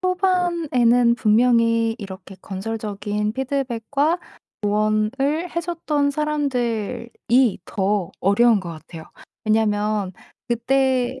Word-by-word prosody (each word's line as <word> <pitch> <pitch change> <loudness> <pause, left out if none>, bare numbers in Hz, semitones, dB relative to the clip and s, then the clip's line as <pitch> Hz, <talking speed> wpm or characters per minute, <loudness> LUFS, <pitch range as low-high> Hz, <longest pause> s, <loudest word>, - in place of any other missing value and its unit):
초반에는 340 -11 +2
분명히 230 0 +3
이렇게 190 -1 -9
건설적인 210 +1 -3
피드백과 275 +4 -1 0.4
조언을 215 +11 0
해 340 - +1
줬던 310 -4 -1
사람들이 250 -5 0
더 195 -2 -1
어려운 215 +3 +4
것 175 -3 -6
같아요. 160 0 -10 0.4
왜냐하면 210 -2 +1 0.4
그때 260 +1 +1
235 Hz, 225 characters per minute, -22 LUFS, 210-275 Hz, 0.4 s, 어려운